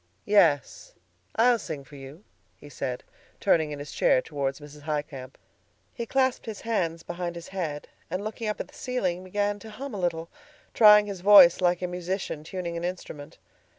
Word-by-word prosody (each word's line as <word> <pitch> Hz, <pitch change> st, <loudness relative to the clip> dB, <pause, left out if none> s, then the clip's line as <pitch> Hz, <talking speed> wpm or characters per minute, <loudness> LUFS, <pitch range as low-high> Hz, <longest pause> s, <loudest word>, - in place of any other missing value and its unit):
"Yes, 200 Hz, -, +2 dB, 0.4 s
I'll 235 Hz, +1 st, +4 dB
sing 155 Hz, -7 st, -6 dB
for 145 Hz, -, -15 dB
you," 140 Hz, +7 st, -11 dB, 0.3 s
he 145 Hz, -, -14 dB
said, 125 Hz, -3 st, -4 dB, 0.4 s
turning 160 Hz, -2 st, +2 dB
in 145 Hz, -, -5 dB
his 145 Hz, 0 st, -8 dB
chair -, -, +3 dB
toward 135 Hz, -1 st, -3 dB
Mrs. 150 Hz, 0 st, -13 dB
Highcamp. 145 Hz, -3 st, -5 dB, 0.6 s
He 235 Hz, -1 st, -5 dB
clasped 260 Hz, -1 st, 0 dB
his 215 Hz, -3 st, -6 dB
hands 170 Hz, -8 st, -1 dB
behind 175 Hz, 0 st, -5 dB
his 170 Hz, 0 st, -9 dB
head, 160 Hz, -6 st, -4 dB, 0.2 s
and 185 Hz, +4 st, -3 dB
looking 220 Hz, +1 st, -5 dB
up 210 Hz, -, -2 dB
at -, -, -4 dB
the -, -, -21 dB
ceiling 185 Hz, -9 st, -2 dB
began 205 Hz, +2 st, -1 dB
to 220 Hz, -, -11 dB
hum 265 Hz, +4 st, -7 dB
a 205 Hz, -, -4 dB
little, 165 Hz, -2 st, -2 dB, 0.5 s
trying 210 Hz, -2 st, +7 dB
his 200 Hz, -3 st, -6 dB
voice 190 Hz, -3 st, +8 dB
like 175 Hz, 0 st, +2 dB
a -, -, 0 dB
musician 180 Hz, -3 st, -4 dB
tuning 170 Hz, 0 st, -5 dB
an 170 Hz, -, -4 dB
instrument. 175 Hz, -5 st, -6 dB
175 Hz, 180 wpm, -26 LUFS, 150-205 Hz, 0.6 s, voice